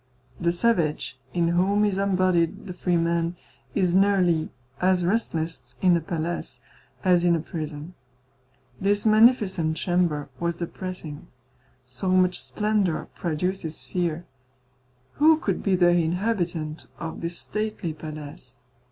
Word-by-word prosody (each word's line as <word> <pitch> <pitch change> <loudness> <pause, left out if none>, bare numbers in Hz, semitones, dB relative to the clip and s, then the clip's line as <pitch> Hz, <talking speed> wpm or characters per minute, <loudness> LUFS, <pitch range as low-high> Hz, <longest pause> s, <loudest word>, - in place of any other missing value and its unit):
The 170 -1 +2
savage, 155 - 0
in 170 +2 +1
whom 195 +4 +3
is 195 -2 0
embodied 185 -4 +1
the 185 - -6
free 180 -1 0
man, 170 +1 0 0.4
is 180 -4 +2
nearly 185 -4 +3 0.3
as 180 -1 +3
restless 165 - -2
in 180 +2 +4
a 170 - +1
palace 160 -5 -4 0.4
as 180 -2 +4
in 175 -1 +4
a - - 0
prison. 155 0 -6 0.9
This 205 +2 +1
magnificent 215 -8 +4
chamber 170 -5 0
was 170 0 -1
depressing. 170 -2 -6 0.6
So 130 +9 -3
much 185 -1 +3
splendour 210 -6 0
produces 170 0 -3
fear. 175 -2 -2 0.9
Who 315 +1 +6
could 320 - -2
be 195 -2 +2
the 175 -1 +5
inhabitant 175 -2 -1
of 165 -2 -6
this 170 +1 -3
stately 210 -6 -3
palace? 150 -5 -8
175 Hz, 125 wpm, -25 LUFS, 160-190 Hz, 0.9 s, Who